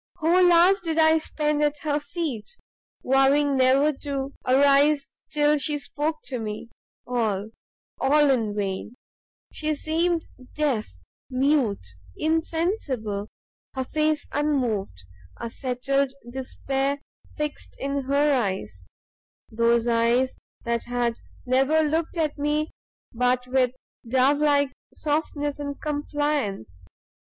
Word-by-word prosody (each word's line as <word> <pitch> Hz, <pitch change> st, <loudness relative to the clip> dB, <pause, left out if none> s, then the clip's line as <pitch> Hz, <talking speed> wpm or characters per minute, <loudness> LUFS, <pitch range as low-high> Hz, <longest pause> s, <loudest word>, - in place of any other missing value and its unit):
"Whole 355 Hz, +2 st, +4 dB
hours 355 Hz, +4 st, +6 dB
did 325 Hz, -2 st, -2 dB
I 320 Hz, 0 st, +5 dB
spend 300 Hz, -1 st, -1 dB
at 295 Hz, 0 st, +1 dB
her 295 Hz, -1 st, +1 dB
feet, 290 Hz, -, -5 dB, 0.5 s
vowing 275 Hz, +2 st, +4 dB
never 265 Hz, +3 st, +4 dB
to 275 Hz, -1 st, -4 dB
arise 280 Hz, +2 st, +4 dB, 0.2 s
till 295 Hz, 0 st, +3 dB
she 295 Hz, +1 st, +2 dB
spoke 305 Hz, +2 st, -3 dB
to 255 Hz, -3 st, -4 dB
me, 220 Hz, +1 st, -6 dB, 0.3 s
all, 220 Hz, -4 st, -1 dB, 0.5 s
all, 290 Hz, +1 st, +4 dB
in 225 Hz, -5 st, 0 dB
vain! 200 Hz, +3 st, -3 dB, 0.6 s
she 310 Hz, 0 st, -1 dB
seemed 330 Hz, +3 st, 0 dB, 0.3 s
deaf, 280 Hz, -8 st, 0 dB, 0.4 s
mute, 260 Hz, -, +1 dB, 0.3 s
insensible; 315 Hz, -, -1 dB, 0.5 s
her 260 Hz, -, -1 dB
face 305 Hz, +2 st, 0 dB
unmoved, 245 Hz, -, -1 dB, 0.4 s
a 235 Hz, -, -5 dB
settled 270 Hz, +2 st, -1 dB
despair 270 Hz, +2 st, -2 dB, 0.4 s
fixed 300 Hz, -1 st, -5 dB
in 275 Hz, 0 st, -2 dB
her 285 Hz, +2 st, +3 dB
eyes, 105 Hz, -, -4 dB, 0.6 s
those 230 Hz, +1 st, +2 dB
eyes 235 Hz, +2 st, +2 dB, 0.3 s
that 235 Hz, -1 st, -1 dB
had 240 Hz, -1 st, -1 dB, 0.3 s
never 270 Hz, +5 st, +3 dB
looked 320 Hz, +3 st, -1 dB
at 305 Hz, -3 st, -1 dB
me 300 Hz, +1 st, 0 dB, 0.4 s
but 250 Hz, +1 st, +1 dB
with 255 Hz, 0 st, +2 dB, 0.4 s
dove 265 Hz, +3 st, +3 dB
like 285 Hz, -2 st, +3 dB, 0.2 s
softness 295 Hz, -1 st, -2 dB
and 285 Hz, -1 st, -5 dB
compliance! 290 Hz, -, -2 dB
280 Hz, 110 wpm, -25 LUFS, 245-300 Hz, 0.6 s, hours